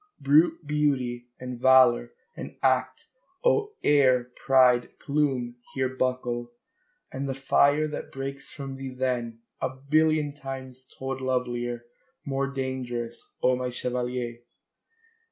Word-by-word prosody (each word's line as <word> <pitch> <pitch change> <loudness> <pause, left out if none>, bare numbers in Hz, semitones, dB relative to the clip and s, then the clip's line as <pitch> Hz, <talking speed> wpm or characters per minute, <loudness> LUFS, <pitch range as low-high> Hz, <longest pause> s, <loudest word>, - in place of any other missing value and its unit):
Brute 155 +4 +4
beauty 135 -5 0
and 125 -1 -6
valour 125 - +5 0.2
and - - -8
act, 130 -1 +1 0.4
oh, 430 -4 +2
air, 130 -4 +4 0.2
pride, 125 -2 +4
plume, 135 -5 0 0.2
here 130 -1 +1
Buckle! 125 -2 -1 0.6
AND 135 +1 -4
the 135 - -2
fire 145 +2 +3
that 150 - -6
breaks 135 +1 -6
from 135 -2 -7
thee 135 0 -5
then, 120 -3 -2 0.2
a 130 - +1
billion 150 +3 +1
Times 130 -2 -8
told 135 0 -4
lovelier, 120 -2 -2 0.4
more 135 0 -1
dangerous, 130 -3 -4
O 130 0 +4
my 125 0 -2
chevalier! 125 -1 -3
130 Hz, 120 wpm, -27 LUFS, 125-140 Hz, 0.6 s, valour